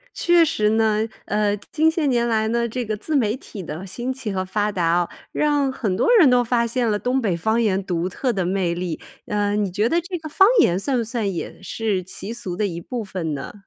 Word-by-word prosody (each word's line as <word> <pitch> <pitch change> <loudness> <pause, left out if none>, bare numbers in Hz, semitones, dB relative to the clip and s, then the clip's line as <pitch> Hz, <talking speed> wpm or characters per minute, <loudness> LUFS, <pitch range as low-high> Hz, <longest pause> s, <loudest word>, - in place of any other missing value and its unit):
确 345 -1 +4
实 215 -8 +1
呢。 220 0 +2 0.2
呃， 210 0 +1 0.2
近 320 +1 +3
些 320 -3 0
年 240 -2 +2
来 220 -1 +1
呢， 235 +1 0
这 245 +2 -3
个 215 -1 -3
自 310 +8 -3
媒 235 -3 +2
体 205 -6 -9
的 165 +3 -6
兴 240 +7 -4
起 245 -6 -4
和 185 0 -1
发 210 +2 -1
达 180 -3 -2
啊， 170 +1 +2 0.2
让 290 -3 +1
很 205 -8 -2
多 475 - +1
人 315 - +7
都 245 0 +4
发 235 0 +1
现 235 0 0
了 210 - +1
东 255 +4 0
北 185 -6 0
方 220 +6 +1
言 195 -3 +1
独 175 0 -1
特 250 +5 -1
的 190 -2 -1
魅 180 -1 0
力。 175 -2 -4 0.3
呃， 205 0 0
你 205 -2 0
觉 210 +4 +1
得 340 +5 +1
这 355 +1 -5
个 315 - -8
方 385 +6 +5
言 175 - +4
算 260 +4 0
不 235 - +1
算 220 -3 -2
也 175 - -6
是 195 0 -2
习 195 +4 -7
俗 225 -7 -5
的 210 - 0
一 170 -3 -4
部 240 +5 -4
分 175 -6 -4
呢？ 135 - -7
215 Hz, 255 characters per minute, -22 LUFS, 190-245 Hz, 0.3 s, 人